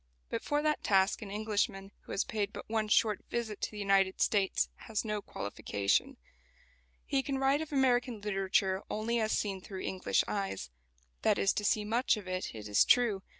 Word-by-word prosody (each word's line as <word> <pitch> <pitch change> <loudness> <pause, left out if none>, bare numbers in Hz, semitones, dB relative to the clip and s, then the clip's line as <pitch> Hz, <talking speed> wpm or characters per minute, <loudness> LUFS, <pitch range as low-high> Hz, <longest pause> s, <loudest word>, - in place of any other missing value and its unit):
But - - -1
for 295 0 0
that 305 0 +1
task 195 +1 +3
an 210 - -7
Englishman 205 -2 -1
who - - -10
has - - +1
paid 205 -2 -2
but - - -8
one 220 -1 0
short 210 -1 +2
visit 225 -3 -3
to - - -1
the 210 - -10
United 195 -2 +2
States 200 -3 +2 0.2
has 220 0 -2
no 210 -1 -2
qualification. 100 - -1 0.9
He 275 - +1
can 270 0 -2
write 270 +2 +2
of 315 - -6
American 250 -4 +2
literature 195 -1 0
only 230 +2 -1
as 220 -1 0
seen 195 -3 -1
through 190 0 -7
English 185 -1 0
eyes. 195 - -3 0.5
That - - +3
is 100 - +3
to 210 - -2
see 210 0 +2
much 235 +2 +2
of 200 -3 -8
it, 185 -8 -3
it 105 -1 -7
is 105 -1 +5
true. 230 -6 +3
210 Hz, 190 wpm, -32 LUFS, 195-230 Hz, 0.9 s, is